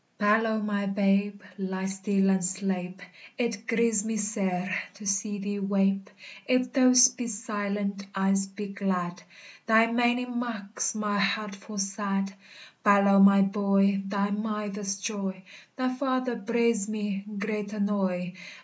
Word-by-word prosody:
Balow, 220 +1 +2
my 205 -1 -1
babe, 200 0 +1 0.2
ly 190 0 -3
stil 195 0 +1
and 190 -1 +1
sleipe! 185 0 -3 0.3
It 230 -3 -2
grieves 230 -2 +2
me 220 0 -2
sair 190 -3 -1 0.2
to 205 +1 -11
see 200 +1 -1
thee 205 +1 -3
weipe; 195 0 +1 0.4
If 255 -1 +2
thoust 255 -1 +6
be 240 - -2
silent, 205 -2 -3
Ise 195 0 +1
be 200 +1 -7
glad, 180 -3 -2 0.5
Thy 225 0 +6
maining 240 +1 0
maks 220 -4 -3
my 210 -1 -1
heart 205 +1 0
ful 205 +1 -10
sad. 195 0 -2 0.5
Balow, 200 -1 +5
my 195 0 +7
boy, 195 0 +2
thy 200 0 -1
mither's 210 -1 -3
joy! 195 -3 -4 0.3
Thy 255 -1 -1
father 255 -2 -1
breides 230 -1 0
me 205 -2 -3
great 210 0 -3
annoy. 195 -4 -1
205 Hz, 130 wpm, -27 LUFS, 195-220 Hz, 0.5 s, my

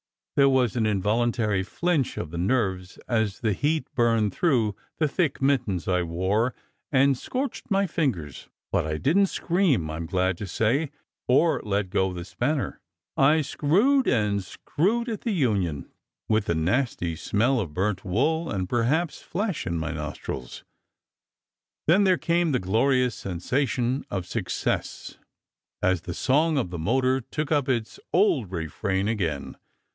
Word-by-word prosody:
There 140 -1 +5
was 130 -4 +2
an 115 -3 +1
involuntary 105 0 +1
flinch 155 - -1
of 75 - -4
the 85 - -5
nerves 95 -3 -1
as 110 -5 0
the 110 -3 +1
heat 150 - 0
burned 115 -5 +2
through 120 - +1 0.2
the 155 - +2
thick 160 0 0
mittens 120 -10 +1
I 90 -1 +2
wore 95 +8 0 0.4
and 135 0 +4
scorched 260 - -4
my 200 -1 +2
fingers, 120 - -2 0.2
but - - +1
I 75 0 -2
didn 165 - +3
t - - +3
scream, 165 - +1
I 80 - -4
m 85 0 -5
glad 90 0 0
to 105 - -5
say, 120 - +1 0.4
or 160 +6 +3
let 100 -2 -1
go 95 -1 +1
the 85 -1 -6
spanner. 135 +7 -2 0.4
I 150 +4 +4
screwed 205 - +2
and 105 -4 +1
screwed 215 - -1
at 220 -4 -3
the 230 - -1
union, 100 - 0 0.4
with 110 -1 +2
the 85 - 0
nasty 90 0 0
smell 120 +10 +1
of 80 -9 -4
burnt 95 0 -1
wool, 150 - 0
and 95 -3 -2
perhaps 135 - 0
flesh, 200 -3 -3
in 85 -1 -1
my 80 0 -2
nostrils. 75 -5 -6 1.2
Then 190 +6 +5
there 185 -2 +4
came 170 -2 +1
the - - +3
glorious 125 +6 +2
sen 95 -4 -5
sation 130 +4 0
of 95 -3 -3
success - - -3 0.6
as 95 -2 +2
the 85 0 -6
song 155 +4 +2
of 105 -10 -1
the 85 - -5
motor 130 +8 +2
took 150 +6 -4
up 145 -3 +2
its 115 -4 -1
old 165 - +3
refrain 95 +4 -2
again. 85 -10 -2
115 Hz, 155 wpm, -26 LUFS, 95-145 Hz, 1.2 s, There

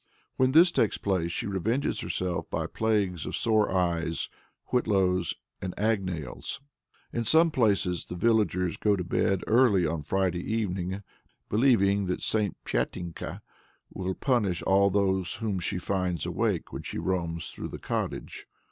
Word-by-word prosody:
When 130 0 +3
this 170 +3 +7
takes 115 - +1
place, 90 -4 0
she 115 - -3
revenges 110 +7 -1
herself 90 -2 -2
by - - -2
plagues 100 -6 0
of - - -3
sore 110 -2 +3
eyes, 85 -3 0 0.4
whitlows 95 -7 +2 0.3
and 95 -1 -4
agnails. 95 - -2 0.5
In 120 - 0
some 160 +8 +5
places 100 - +1
the - - -7
villagers 90 -4 +1
go 105 -1 +2
to 90 - -3
bed 90 +2 +1
early 110 -6 +4
on 80 0 -1
Friday 90 +3 0
evening, 95 -2 -2 0.5
believing 100 -4 +3
that 90 - -2
"St. 105 -4 0
Pyatinka" 85 +8 -3 0.5
will 95 0 -3
punish 105 -10 0
all 100 +1 +4
whom 95 +1 0
she 90 - -2
finds 90 -3 -1
awake - - -1
when - - -4
she - - -6
roams 85 -3 -2
through - - -6
the - - -6
cottage. - - -4
95 Hz, 140 wpm, -28 LUFS, 90-110 Hz, 0.5 s, this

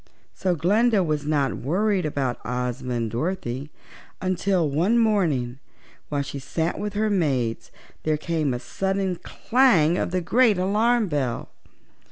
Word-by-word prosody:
So 185 -2 0
Glinda 205 +6 +3
was 150 -3 -2
not 145 -4 +1
worried 185 - 0
about 135 -4 -2
Ozma 125 0 -3
and 115 -2 -2
Dorothy 140 - -3 0.5
until 185 -2 +1
one 170 +11 +2
morning, 160 - +1 0.5
while 145 -1 -1
she 140 0 -6
sat 160 +5 -2
with 205 -1 -3
her 215 +1 0
maids, 135 - 0 0.3
there 155 -1 0
came 155 -2 -1
a 125 - -1
sudden 190 +3 -2
clang 185 - +2
of - - -1
the 185 +1 0
great 220 +4 +3
alarm 215 +5 +2
bell. 140 -7 -2
165 Hz, 140 wpm, -24 LUFS, 140-195 Hz, 0.5 s, Glinda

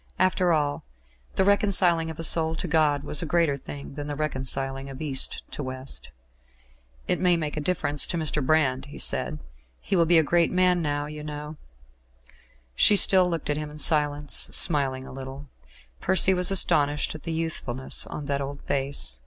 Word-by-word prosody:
After 185 -1 +1
all, 145 -3 -1 0.5
the - - +2
reconciling 190 -5 +3
of 160 - -8
a 165 - -6
soul 160 0 +4
to - - -5
God 150 -3 +1
was 150 - +1
a - - -3
greater 165 -3 +1
thing 140 +1 -10
than 145 0 -7
the 145 - -5
reconciling 135 -2 -2
of 135 -1 -10
East 140 -4 0
to - - -6
West. 130 0 -8 1.0
"It - - 0
may 180 -2 +2
make 150 -2 -4
a 150 - -3
difference 150 -3 0
to 175 - -3
Mr. 155 -2 -2
Brand," 135 -3 +1
he 145 - -12
said. - - +1 0.4
"He - - -3
will 170 -2 +2
be 170 0 +5
a 160 - +4
great 170 +2 +1
man, 180 -1 +2
now, 145 -2 -2
you 150 0 -9
know." 150 0 -8 1.2
She 205 - +3
still 185 -1 +5
looked 165 -3 -3
at 145 - -2
him 150 0 -5
in 150 - -12
silence, 150 -1 +1
smiling 135 -5 +2
a - - -11
little. 135 +1 -9 0.5
Percy 190 +1 +3
was 180 -1 +2
astonished 150 -6 +3
at 155 - -10
the 165 - -6
youthfulness 160 -6 -3
of 150 - -7
that 140 0 -2
old 140 +1 -7
face. 135 - +2
150 Hz, 185 wpm, -24 LUFS, 140-165 Hz, 1.2 s, be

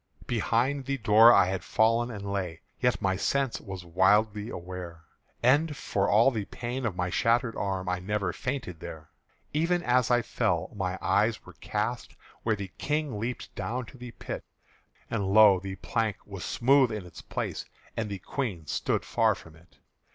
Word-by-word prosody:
Behind 125 +4 0
the 140 +1 -1
door 110 0 +7
I 120 - +6
had 95 +1 -2
fall'n 115 +2 +2
and 100 -3 -5
lay, 90 -5 -3 0.2
Yet 125 -4 +1
my 95 -1 +2
sense 135 +6 0
was 95 -3 -8
widely 105 +5 +2
aware, 90 -2 -7 0.4
And 145 +4 +3
for 100 0 0
all 115 +6 +5
the 110 -5 -3
pain 120 +3 -4
of 100 - -4
my 90 0 -1
shattered 115 +3 +2
arm 95 -2 -2
I 90 0 0
never 100 -1 -1
fainted 130 - -4
there. 80 0 -9 0.4
Even 170 +3 +1
as 125 -1 +3
I 120 -1 +3
fell, - - -1
my 95 -2 -2
eyes - - +2
were - - -12
cast - - -3 0.3
Where 110 -2 +1
the 100 -2 -7
King 150 -6 -1
leaped 120 +3 -4
down 120 +6 -3
to 130 - -14
the 125 0 -7
pit; 115 - -6 0.7
And 100 - -1
lo! 105 -3 +8
the 95 0 -6
plank 110 +1 -1
was 100 -3 -7
smooth 130 0 +3
in 105 -4 -4
its 90 - -11
place, - - -4 0.3
And 110 -2 -2
the 100 - -4
Queen 95 - -4
stood - - -1
far - - +2
from 80 -1 -14
it. 85 +2 -22
105 Hz, 175 wpm, -28 LUFS, 95-125 Hz, 0.7 s, lo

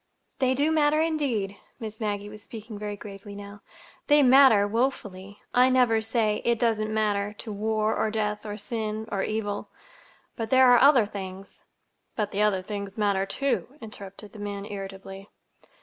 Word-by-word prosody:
"They 260 -1 +2
do 290 +4 +2
matter, 305 -1 +3
indeed." 270 -12 -1 0.2
Miss 220 -2 -7
Maggie 205 -2 -2
was 210 0 -11
speaking 220 -1 -9
very 210 0 -4
gravely 200 0 -10
now. 205 0 -10 0.5
"They 295 -1 +6
matter—woefully. 220 -5 +3
I 250 +1 +5
never 245 -4 +3
say 220 -1 0
'It 235 0 +2
doesn't 220 -2 0
matter' 210 -1 0
to 215 +1 -8
war, 215 +1 0
or 220 - 0
death, 210 -1 -2
or 210 -1 -5
sin, 220 0 -4
or 195 - -1
evil. 205 -1 -3 0.7
But 225 -2 -4
there 260 +1 +6
are 245 - +7
other 270 -5 +6
things—" 195 -1 -8 0.5
"But 210 -2 -1
the 200 - -1
other 200 -3 +2
things 200 0 -6
matter, 200 -2 +1
too," 275 +2 -2
interrupted 205 -2 -9
the 215 - -11
man 205 -1 -5
irritably. 195 -1 -8
215 Hz, 160 wpm, -26 LUFS, 205-235 Hz, 0.7 s, are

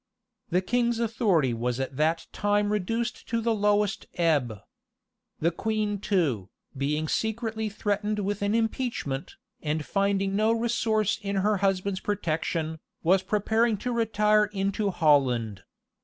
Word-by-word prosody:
The 180 +2 +1
king's 240 +2 +1
authority 205 - +1
was 120 +2 -2
at 135 0 -3
that 160 +3 +1
time 205 0 +1
reduced 225 +4 -2
to 230 - 0
the 230 0 +1
lowest 205 -1 +1
ebb. 145 - +1 0.8
The 165 +2 +2
queen 210 +2 -1
too, 150 - 0 0.3
being 150 +3 -1
secretly 220 - -1
threatened 210 0 -1
with 205 0 -2
an 205 +2 +1
impeachment, 225 - -2 0.3
and 150 -1 -2
finding 195 -1 0
no 215 +2 +3
resource 225 -3 +1
in 200 -1 -3
her 205 +2 +2
husband's 195 0 0
protection, 160 -4 -2 0.2
was 185 +3 +4
preparing 220 +3 +1
to 245 +5 -3
retire 215 -2 +3
into 200 0 -1
Holland. 130 - +2
200 Hz, 130 wpm, -27 LUFS, 160-215 Hz, 0.8 s, was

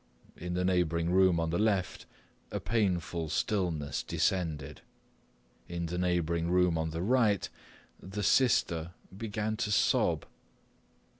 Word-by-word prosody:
In 90 +1 -5
the 90 0 0
neighbouring 85 -2 +1
room 95 -2 +4
on 80 -1 -1
the 85 - 0
left 100 -4 0 0.4
a - - -3
painful 90 -7 -1
stillness 80 -8 -1
descended. 80 -7 -2 0.9
In 85 0 -3
the 90 +2 -3
neighbouring 85 -2 0
room 90 -1 +3
on 80 0 -1
the 80 +2 -4
right 110 -3 +2 0.5
the 100 +2 -5
sister 85 -10 +2 0.2
began 110 +1 -3
to 110 - -1
sob. - - +2
90 Hz, 125 wpm, -30 LUFS, 85-100 Hz, 0.9 s, room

